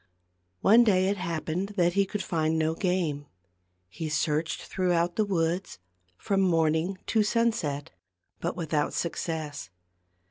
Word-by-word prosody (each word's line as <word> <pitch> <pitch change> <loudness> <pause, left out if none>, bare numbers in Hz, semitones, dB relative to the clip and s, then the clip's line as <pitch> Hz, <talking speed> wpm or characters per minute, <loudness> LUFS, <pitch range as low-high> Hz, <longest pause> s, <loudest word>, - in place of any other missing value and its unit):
One 225 +4 +7
day 190 -4 +3
it 200 - 0
happened 170 +3 -3
that 175 -1 +3
he 200 0 +2
could 205 0 -3
find 160 -1 0
no 160 0 +1
game. 165 -6 -1 0.6
He 155 - -5
searched 155 +1 -1
throughout 175 -2 0
the 215 - +2
woods, 175 - -1 0.4
from 195 -1 0
morning 165 0 +2
to 220 - +2
sunset, 210 -10 0 0.5
but 170 - -2
without 155 -3 -1
success. 160 -3 -3
170 Hz, 130 wpm, -28 LUFS, 160-195 Hz, 0.6 s, One